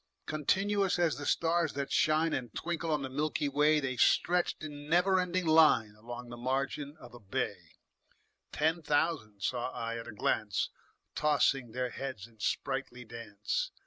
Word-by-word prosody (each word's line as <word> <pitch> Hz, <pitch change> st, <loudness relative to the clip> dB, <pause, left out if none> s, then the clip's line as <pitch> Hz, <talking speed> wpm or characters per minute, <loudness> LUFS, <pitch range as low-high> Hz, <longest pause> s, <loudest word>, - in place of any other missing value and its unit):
Continuous 195 Hz, +6 st, +1 dB
as 170 Hz, -3 st, +2 dB
the 145 Hz, -, -5 dB
stars 165 Hz, -1 st, +2 dB
that 140 Hz, -1 st, -3 dB
shine 155 Hz, +1 st, +3 dB
And 120 Hz, -3 st, -3 dB
twinkle 170 Hz, -1 st, -3 dB
on 150 Hz, -3 st, +1 dB
the -, -, -2 dB
milky 145 Hz, +2 st, -1 dB
way, 150 Hz, +2 st, +3 dB
The 130 Hz, -3 st, -3 dB
stretched 175 Hz, +5 st, +2 dB
in 145 Hz, -1 st, -7 dB
never 180 Hz, +3 st, +4 dB
ending 180 Hz, 0 st, 0 dB
line 155 Hz, -9 st, +5 dB
Along 120 Hz, +3 st, -8 dB
the 120 Hz, -, -8 dB
margin 140 Hz, +4 st, -2 dB
of 125 Hz, -5 st, -13 dB
a 120 Hz, -, -11 dB
bay: 100 Hz, -3 st, -4 dB, 0.8 s
Ten 160 Hz, +3 st, +1 dB
thousand 145 Hz, -9 st, 0 dB
saw 125 Hz, +3 st, -1 dB
I 115 Hz, -2 st, -4 dB
at 115 Hz, -, -8 dB
a -, -, -6 dB
glance, 105 Hz, 0 st, 0 dB, 0.4 s
Tossing 135 Hz, -5 st, +2 dB
their 125 Hz, -1 st, -2 dB
heads 130 Hz, -7 st, -5 dB
in 115 Hz, -2 st, -20 dB
sprightly 125 Hz, +1 st, -2 dB
dance. 115 Hz, -, -3 dB
145 Hz, 160 wpm, -31 LUFS, 120-160 Hz, 0.8 s, line